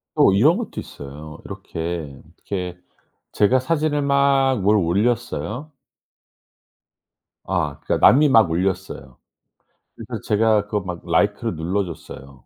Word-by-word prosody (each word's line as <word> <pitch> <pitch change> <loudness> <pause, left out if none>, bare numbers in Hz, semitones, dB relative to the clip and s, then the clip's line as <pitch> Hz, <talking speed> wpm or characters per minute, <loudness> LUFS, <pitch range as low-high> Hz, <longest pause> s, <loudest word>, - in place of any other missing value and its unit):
또 - - +5
이런 145 - +4
것도 240 - -5
있어요. 75 +2 -10
이렇게, 80 -4 -6 0.2
이렇게 90 -3 -5 0.6
제가 115 +5 +3
사진을 150 +1 0
막 140 -3 +2
뭘 105 +3 +3
올렸어요. 105 - -1 1.8
아 85 -7 -2
그러니까 - - +3
남이 145 +3 +4
막 110 -9 +5
올렸어요. 90 -7 -3 0.8
그래서 - - -7
제가 110 -1 +2
그거 105 0 -2
막 90 -2 -6
라이크를 105 +5 0
눌러 90 +5 -1
줬어요. 70 -5 -11
100 Hz, 260 characters per minute, -21 LUFS, 85-125 Hz, 1.8 s, 또